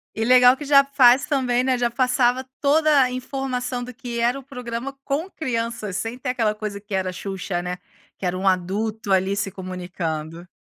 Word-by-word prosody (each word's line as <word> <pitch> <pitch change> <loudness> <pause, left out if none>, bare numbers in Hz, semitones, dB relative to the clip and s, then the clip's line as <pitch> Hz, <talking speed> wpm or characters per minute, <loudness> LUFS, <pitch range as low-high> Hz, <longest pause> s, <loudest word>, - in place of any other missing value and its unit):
E 225 - -1
legal 250 +1 +6
que 295 - -7
já 275 -1 +6
faz 270 0 +5
também, 255 -4 +1
né, 260 -1 +1
já 240 -1 0
passava 250 0 +2 0.2
toda 300 0 +4
a 255 -1 +2
informação, 255 -1 -3
do 250 +1 -8
que 240 -2 -6
era 240 +3 +1
o - - -13
programa 250 0 -6
com 305 +7 -2
crianças, 230 - -3
sem 225 +3 -4
ter 255 - -4
aquela 225 -4 0
coisa 210 -1 -5
que 205 0 -10
era 185 -1 -1
Xuxa, 190 -2 -4
né, 180 0 -4 0.4
que - - -6
era 180 0 -1
um 190 +1 -1
adulto 200 +4 -1
ali 190 +1 +2
se 200 -1 -2
comunicando. 175 -3 -5
240 Hz, 190 wpm, -23 LUFS, 195-255 Hz, 0.4 s, legal